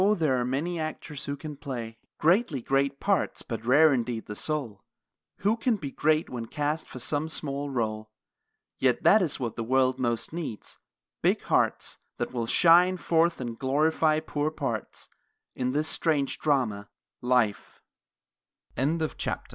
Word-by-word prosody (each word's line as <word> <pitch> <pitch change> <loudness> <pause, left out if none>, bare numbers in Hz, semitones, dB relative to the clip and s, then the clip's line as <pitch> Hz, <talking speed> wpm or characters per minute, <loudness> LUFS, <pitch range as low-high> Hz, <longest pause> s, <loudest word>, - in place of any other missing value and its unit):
There 145 -6 +2
are - - -1
many 155 +7 -2
actors 155 -2 -5
who 140 0 -3
can 150 0 -8
play 120 -6 -6 0.2
Greatly 170 - +2
great 135 +2 0
parts, 200 -1 0
but 115 -2 -5
rare 145 +6 +6
indeed 120 -2 -2
the 105 - -7
soul 120 -9 -3 0.6
Who 205 +3 +3
can 230 0 +1
be 145 -9 -6
great 155 +3 +1
when 120 -2 -6
cast 150 +5 -2
for - - -9
some 145 +5 -1
small 145 -2 -3
role; 110 -4 -2 0.7
Yet 130 -2 +2
that 215 - +6
is 160 -6 -1
what 120 -4 -3
the 115 - -3
world 130 +2 +2
most 120 +2 -1
needs, 160 -11 -6 0.4
big - - +2
hearts - - 0 0.2
That - - -3
will 120 -2 -2
shine 175 +6 +5
forth 170 0 +2
and 120 -3 -5
glorify 155 +3 +2
poor 145 0 -1
parts 135 -9 -5 0.5
I 140 -4 0
140 Hz, 135 wpm, -27 LUFS, 125-155 Hz, 0.7 s, rare